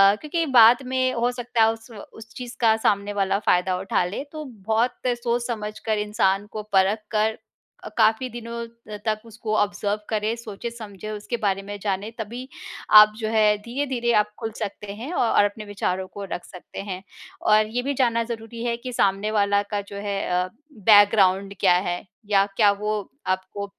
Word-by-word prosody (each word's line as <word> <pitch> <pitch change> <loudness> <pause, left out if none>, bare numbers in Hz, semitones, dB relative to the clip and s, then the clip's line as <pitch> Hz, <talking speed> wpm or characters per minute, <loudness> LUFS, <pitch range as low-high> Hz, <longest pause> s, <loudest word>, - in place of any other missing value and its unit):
क्योंकि 320 +6 -2
बाद 235 +4 +7
में 255 0 +2
हो 240 +1 +1
सकता 245 -2 0
है 220 - +5
उस 225 +1 -14 0.2
उस 225 +1 -13
चीज़ 245 -1 -7
का 220 -1 +5
सामने 200 0 +1
वाला 195 +1 +1
फ़ायदा 180 -2 +2
उठा 190 -2 0
ले, 200 +9 -4
तो 310 -1 -6
बहुत 225 +1 -1 0.3
सोच-समझ 235 -3 -2
कर 220 -1 +1
इंसान 195 0 +1
को 215 -1 -5
परख 195 +3 +4
कर 220 0 +1 0.5
अ, - - -6
काफ़ी 225 +3 +3
दिनों 235 0 -6 0.4
तक 215 -1 0
उसको 220 -1 -4
ऑब्ज़र्व 205 0 0
करें, 215 +1 0
सोचे-समझे 215 -2 -8
उसके 215 +3 -4
बारे 195 -3 0
में 205 +1 -6
जाने 200 +1 -2
तभी 240 +4 -6 0.5
आप 215 0 +7
जो 220 -2 -3
है, 215 -1 +4
धीरे-धीरे 240 0 -1
आप 210 0 -7
खुल 225 -1 -4
सकते 205 -1 -5
हैं 245 +10 -7
औ - - +2
और 205 - +6
अपने 210 +1 -4
विचारों 190 -2 -2
को 200 - -8
रख 175 - -5
सकते 180 - -11
हैं। 185 +1 -5 0.4
और 215 0 +4
ये 245 +3 -2
भी 280 +1 -1
जानना 235 -3 +2
ज़रूरी 230 0 -6
है 235 -1 0
कि 250 +1 -7
सामने 200 0 +1
वाला 200 -1 +2
का 205 -1 0
जो - - -7
है, 200 -1 -2 0.2
अ, - - -7 0.3
बैकग्राउंड 200 -2 +5
क्या 185 -3 +5 0.2
है 175 - -3 0.3
या 195 -1 +4
क्या 205 -3 +6
वो 210 +1 -2 0.3
आपको 190 +2 -2
215 Hz, 180 wpm, -24 LUFS, 200-235 Hz, 0.5 s, बाद